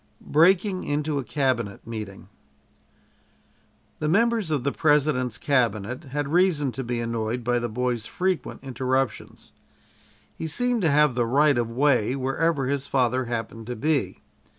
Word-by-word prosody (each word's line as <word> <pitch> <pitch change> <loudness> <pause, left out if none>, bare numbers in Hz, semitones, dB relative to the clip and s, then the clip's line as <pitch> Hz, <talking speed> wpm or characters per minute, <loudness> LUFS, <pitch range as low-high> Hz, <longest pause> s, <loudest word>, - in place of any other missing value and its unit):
BREAKING 185 +5 +3
INTO 145 0 -1
A - - -3
CABINET 120 -6 -1
MEETING 105 -4 -7 1.7
The 155 - -1
members 225 +2 +2
of 145 -5 -1
the 140 - 0
President's 140 -6 +1
cabinet 125 -2 0
had 140 +1 -3
reason 170 -7 +2
to 135 - -5
be 120 -1 -3
annoyed 115 +1 -2
by 120 +1 +1
the 120 0 -3
boy's 120 0 -2
frequent 185 -6 -2
interruptions. 130 0 -2 0.8
He 160 - -4
seemed 245 +6 0
to 165 - +3
have 150 -1 +4
the 120 -1 0
right 145 +4 +4
of 120 -1 0
way 125 -1 +2
wherever 135 +2 0
his 140 +1 -2
father 130 -1 +1
happened 115 -1 -5
to 125 - -4
be. 150 +4 -1
135 Hz, 145 wpm, -25 LUFS, 120-150 Hz, 1.7 s, have